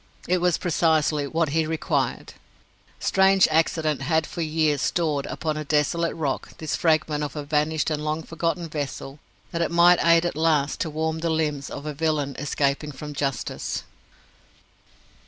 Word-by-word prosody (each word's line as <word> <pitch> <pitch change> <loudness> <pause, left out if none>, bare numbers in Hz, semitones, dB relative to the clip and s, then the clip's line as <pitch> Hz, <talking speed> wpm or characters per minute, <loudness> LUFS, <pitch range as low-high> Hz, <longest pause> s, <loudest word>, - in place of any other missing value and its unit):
It 180 +1 +2
was 180 -2 +2
precisely 155 -3 +1
what 160 +1 0
he 160 +2 +1
required. 160 0 -1 0.7
Strange 190 0 +4
accident 155 -1 +1
that 135 - -5
had 160 +1 +2
for 170 - -6
years 155 -3 +1
stored, 155 -5 0
upon 155 -1 -3
a 155 - -3
desolate 155 +3 0
rock, 145 -5 -3
this 155 -2 -2
fragment 155 -2 +1
of 145 -1 -5
a 150 - -4
vanished 150 +2 0
and 150 0 -2
long 155 +1 -2
forgotten 165 +1 -2
vessel, 145 -2 -5 0.3
that 170 -2 -2
it 170 - +1
might 175 +1 +5
aid 170 0 +5
at 175 - -2
last 155 -3 +1
to 165 - -1
warm 160 +1 -2
the 165 +1 -1
limbs 150 -3 -1
of 140 - -7
a 150 - -3
villain 145 -2 -1
escaping 145 +1 -1
from 150 +2 -8
justice! 140 -4 -3
155 Hz, 165 wpm, -24 LUFS, 150-165 Hz, 0.7 s, might